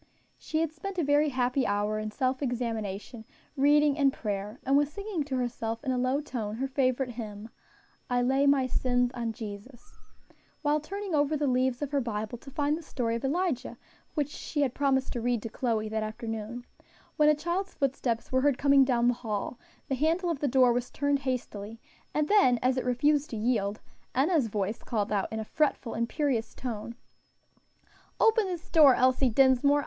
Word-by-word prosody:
She 315 0 -2
had 325 -2 0
spent 375 +5 -7
a 345 - +1
very 290 +1 +3
happy 255 0 0
hour 205 +1 0
in 215 0 -3
self 260 +4 -1
examination, 230 -4 -3 0.3
reading 295 +1 +4
and 275 -1 +4
prayer, 210 -1 -4
and 270 - +3
was 290 +1 +3
singing 400 -2 -3
to 270 -2 -3
herself 230 -2 -3
in 265 - -1
a 255 - 0
low 255 +3 +1
tone 225 -8 -4
her 260 +4 -2
favorite 260 -1 0
hymn, 220 -2 -7 0.6
"I 245 0 +2
lay 270 +3 +2
my 280 -2 +4
sins 245 -1 +1
on 235 -2 -2
Jesus," 225 +2 -10 0.6
while 295 +1 +2
turning 390 +4 -5
over 295 0 +2
the 295 - 0
leaves 255 0 +1
of 285 - -4
her 285 -1 +1
Bible 220 0 -4
to 275 - -12
find 290 +2 0
the 330 - -6
story 245 -7 -2
of 235 - -3
Elijah, 310 -1 -1 0.4
which 295 -3 0
she 295 0 -4
had 265 -4 +1
promised 270 -2 +1
to 240 - -3
read 240 -2 0
to 225 - -4
Chloe 220 -2 -1
that 220 0 -2
afternoon, 225 +2 -5 0.5
when 300 0 +5
a 305 - +5
child's 345 +5 -3
footsteps 255 -4 -1
were 260 0 +2
heard 285 -2 +2
coming 280 -1 +5
down 240 -2 +2
the 245 - +4
hall, 230 0 -4 0.3
the - - -2
handle 330 +6 +1
of 310 - -3
the 290 - 0
door 255 -2 +4
was 245 0 -2
turned 285 0 0
hastily, 230 -5 -4 0.3
and 300 0 0
then, 385 -12 +5
as 255 0 +3
it 255 - -2
refused 290 +4 +2
to 225 - -5
yield, 215 -2 0 0.3
Enna's 285 -1 +2
voice 210 +1 -2
called 215 -2 -2
out 200 -2 0
in 220 - -3
a 220 - -4
fretful, 280 -3 0
imperious 235 0 -1
tone, 235 -2 -5 1.2
"Open 445 -2 +4
this 355 -2 -5
door, 295 -6 +7
Elsie 255 +1 +3
Dinsmore. 270 +4 +4
255 Hz, 190 wpm, -28 LUFS, 230-290 Hz, 1.2 s, door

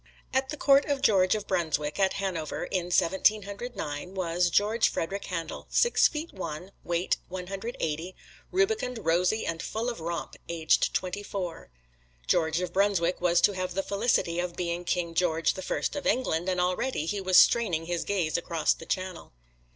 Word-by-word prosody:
At 265 0 +1
the 300 - -4
Court 275 0 +5
of 280 -2 -1
George 190 -4 +4
of 210 -1 -4
Brunswick, 155 -4 -1
at 190 -1 +3
Hanover, 180 -6 -3
in 180 -2 -2
Seventeen 190 +4 +3
Hundred 215 +5 -7
Nine, 155 +1 -5
was 175 -1 +1
George 210 +6 +3
Frederick 195 +4 -3
Handel, 170 -3 -5
six 475 - +4
feet 315 +2 -6
one, 180 0 -6
weight 170 +1 0
one 180 0 -5
hundred 195 +6 -5
eighty, 165 +4 -3 0.4
rubicund, 375 - 0
rosy, 180 +6 +2
and 165 -1 -3
full 230 +3 -2
of 235 - -9
romp, 170 +1 -4
aged 165 -2 +2
twenty 185 +2 -2
four. 190 -4 -5 0.6
George 160 - +1
of 180 -1 -4
Brunswick 185 -3 +2
was 175 -1 +3
to - - +5
have 185 -2 -4
the 195 - 0
felicity 200 -5 +1
of 175 -1 -3
being 175 0 -3
King 170 -1 -1
George 165 -1 +2
the 190 - -7
First 185 - -2
of 290 - -3
England, 180 -8 +1
and 180 -1 0
already 180 - 0
he 200 +4 -2
was 185 -1 +4
straining 180 -9 +4
his 175 0 -2
gaze 175 -6 0
across 170 -2 +1
the 165 - -12
Channel. 185 - -4
185 Hz, 180 wpm, -28 LUFS, 170-205 Hz, 0.6 s, Court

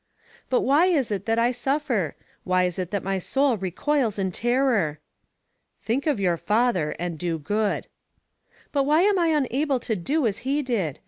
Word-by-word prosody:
"But 255 - +2
why 295 +7 +4
is 290 -11 +1
it 200 0 -3
that 225 0 +1
I 235 +1 +3
suffer? 250 - -1 0.3
Why 185 0 +2
is 180 0 -1
it 180 -2 -3
that 200 -1 -2
my 195 0 -1
soul 270 +6 +1
recoils 215 - -1
in 190 -2 -1
terror?" 235 - +1 0.9
"Think 260 +7 -1
of 285 -8 +1
your 180 -3 +1
father 210 -6 +1
and 170 -2 -4
do 170 -2 -1
good." 205 +7 -1 0.9
"But 280 -1 +1
why 305 +3 +4
am 405 -1 +3
I 340 - +2
unable 285 -2 +1
to 225 - -2
do 275 - 0
as 210 -2 0
he 280 +3 -1
did? 200 - -2
230 Hz, 180 wpm, -24 LUFS, 185-275 Hz, 0.9 s, why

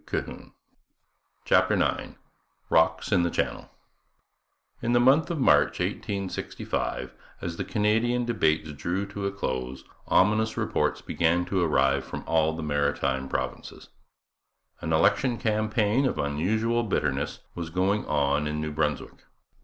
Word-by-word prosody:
CHAPTER - - +4
IX - - -1 0.6
ROCKS 80 +3 +2
IN 95 -4 +4
THE 85 - +1
CHANNEL - - -2 1.1
In 120 +1 0
the 120 - +5
month 135 +7 +4
of 170 - -2
March 130 - +4
1865, 100 -2 -3 0.3
as 85 0 -5
the - - -2
Canadian 115 +3 +1
debates 80 -9 +1
drew 85 +7 -2
to 100 0 -4
a - - -2
close, 65 -8 -4 0.2
ominous 110 +3 +3
reports - - 0
began 85 +2 +1
to 95 0 0
arrive 70 -4 +2
from - - -7
all 80 -1 +2
the 80 0 -5
Maritime 70 -2 0
Provinces. - - -5 0.9
An 80 - -4
election 120 +9 +3
campaign 110 +3 +1
of - - -2
unusual 110 +11 0
bitterness 75 - -1
was 85 -2 -5
going 95 +5 +1
on 70 0 +1
in 75 0 -2
New 75 0 -3
Brunswick. 75 -1 -3
85 Hz, 130 wpm, -26 LUFS, 75-110 Hz, 1.1 s, the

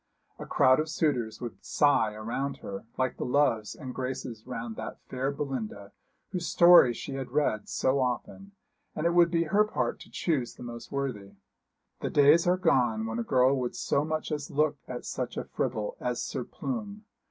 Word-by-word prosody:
A - - -7
crowd 130 +1 +4
of 155 +1 -1
suitors 125 -9 0
would 120 -2 -7
sigh 115 -7 +2
around 120 +6 -3
her, 100 +3 -7
like 130 -1 0
the - - -3
loves 125 -5 +1
and 130 -4 -7
graces 125 -3 -5
round 115 -2 -5
that - - -6
fair 130 +1 -1
Belinda 120 -8 -5 0.4
whose 180 -3 -3
story 170 -8 +7
she 125 +3 -6
had 135 -1 -4
read 135 -6 0
so 130 +1 +1
often; 130 +10 -3 0.4
and 155 - -2
it 170 - +4
would 170 -1 +6
be 165 -1 +2
her 200 +6 +3
part 125 - -2
to - - -13
choose 140 -9 -1
the - - -10
most 120 -1 -8
worthy. 125 -8 -3 0.7
The - - -2
days 150 +4 +5
are 180 +1 +4
gone 120 -10 +2
when 115 +1 -3
a - - 0
girl 130 +3 +3
would 125 -1 -3
so 140 - 0
much 155 +1 -3
as 150 -1 -3
look 150 -1 +1
at 125 -1 -6
such - - -4
a - - -2
fribble - - -3
as - - -2
Sir - - -3
Plume. 215 -4 -5
135 Hz, 185 wpm, -28 LUFS, 120-155 Hz, 0.7 s, story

